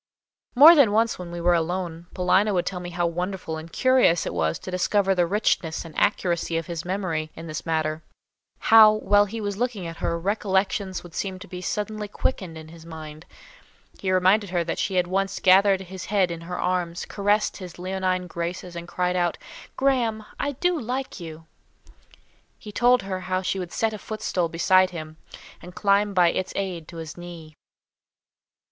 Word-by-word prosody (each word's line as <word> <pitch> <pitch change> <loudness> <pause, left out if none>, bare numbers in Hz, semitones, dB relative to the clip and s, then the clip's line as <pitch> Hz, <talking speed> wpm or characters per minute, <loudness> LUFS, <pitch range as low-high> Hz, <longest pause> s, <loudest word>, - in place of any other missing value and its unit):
More 300 +7 +10
than 280 -10 +5
once 225 -1 +2
when 180 -1 -7
we 175 0 -6
were 175 +1 +3
alone, 170 0 -2
Paulina 190 +3 +2
would 175 - +1
tell 185 - -3
me 175 0 -6
how 175 0 -1
wonderful 175 0 -3
and 160 +1 -9
curious 255 -9 +3
it - - -3
was 80 0 0
to 185 - -8
discover 195 +2 +2
the 175 -2 +2
richness 175 -5 0
and 165 - -10
accuracy 170 -4 0
of 165 - -3
his 170 -2 -5
memory 180 -4 -2
in 165 - -9
this 155 -1 -6
matter. 155 -1 -1 0.6
How, 220 -2 +7
while 205 -1 +3
he 225 +3 -6
was 205 -2 -3
looking 235 -6 -2
at 165 0 -7
her, 170 - -1
recollections 195 0 -1
would 175 -2 -13
seem 190 0 -3
to 200 +2 -11
be 180 -2 -7
suddenly 210 +2 -3
quickened 185 -6 -3
in 160 0 -10
his 165 0 -13
mind. 160 -1 -10 0.7
He 190 - -1
reminded 185 +2 +3
her 175 -1 0
that 165 - -4
she 190 - -1
had 180 -1 +3
once 195 +2 -1
gathered 190 +1 +5
his 190 0 -8
head 195 -4 +1
in 165 -1 -6
her 180 +2 -6
arms, 180 -1 -1
caressed 205 +1 0
his 180 -3 -9
leonine 185 0 -1
graces, 175 +1 -5
and 170 0 -7
cried 180 +1 -1
out, 175 -2 0 0.4
"Graham, 235 -5 +1
I 285 - -1
do 355 +4 0
like 255 +2 -4
you!" 160 -1 -9 1.1
He 210 - -10
told 245 +2 +3
her 190 -1 -4
how 185 0 -2
she 190 - -1
would 180 -2 -5
set 225 -1 0
a 215 - -6
footstool 195 -6 -2
beside 185 +3 +3
him, 155 -3 -8 0.4
and 180 0 -12
climb 200 0 +2
by 175 -2 +5
its 185 - -3
aid 180 -5 -3
to 170 - -10
his 160 0 -7
knee. 170 -3 -10
185 Hz, 190 wpm, -24 LUFS, 170-205 Hz, 1.1 s, More